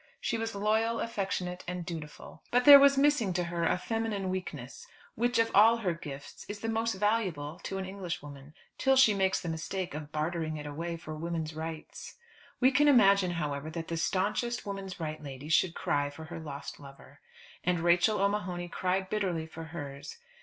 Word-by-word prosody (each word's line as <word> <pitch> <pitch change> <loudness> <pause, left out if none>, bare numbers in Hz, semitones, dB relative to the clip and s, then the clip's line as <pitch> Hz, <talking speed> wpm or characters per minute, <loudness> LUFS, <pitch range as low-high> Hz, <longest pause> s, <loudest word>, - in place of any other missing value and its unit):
She 230 - -1
was 225 -1 -3
loyal, 220 +3 +1
affectionate, 190 -5 -3
and 180 -1 -4
dutiful. 160 -4 -8
But 245 +1 +2
there 285 -1 +12
was 280 0 +6
missing 275 -9 +3
to 175 0 0
her 170 -1 -2
a - - +2
feminine 210 -2 -2
weakness, 150 -9 -6 0.3
which 240 +2 0
of 225 0 +2
all 225 +3 +7
her 190 -7 -1
gifts 145 -4 -9
is 205 0 -6
the 225 - -2
most 225 0 0
valuable 190 -7 -1
to 195 - -3
an 190 - -3
English 185 -3 -5
woman, 145 +1 -12 0.2
till 270 0 +4
she 260 -5 +6
makes 190 -1 +1
the - - -7
mistake 165 +3 -3
of 150 0 -7
bartering 155 0 -2
it 150 - -7
away 165 +3 -4
for 155 -2 -8
women's 160 0 -3
rights. 160 0 -7 0.4
We 260 +1 +5
can 290 +3 +4
imagine, 200 -8 +6
however, 145 -1 -3
that 165 0 -6
the 165 - -2
stanchest 205 +8 -1
woman's 195 -2 -6
right 155 -1 -4
lady 140 0 -8
should 170 +1 +3
cry 145 0 0
for 160 +2 -10
her 165 +1 -7
lost 145 -3 -7
lover. 140 -1 -14 0.4
And 180 -1 +1
Rachel 175 +5 +3
O'Mahony 185 -4 -1
cried 185 +2 -1
bitterly 185 -5 -1
for 160 0 -9
hers. 145 -4 -8
180 Hz, 185 wpm, -30 LUFS, 160-210 Hz, 0.4 s, there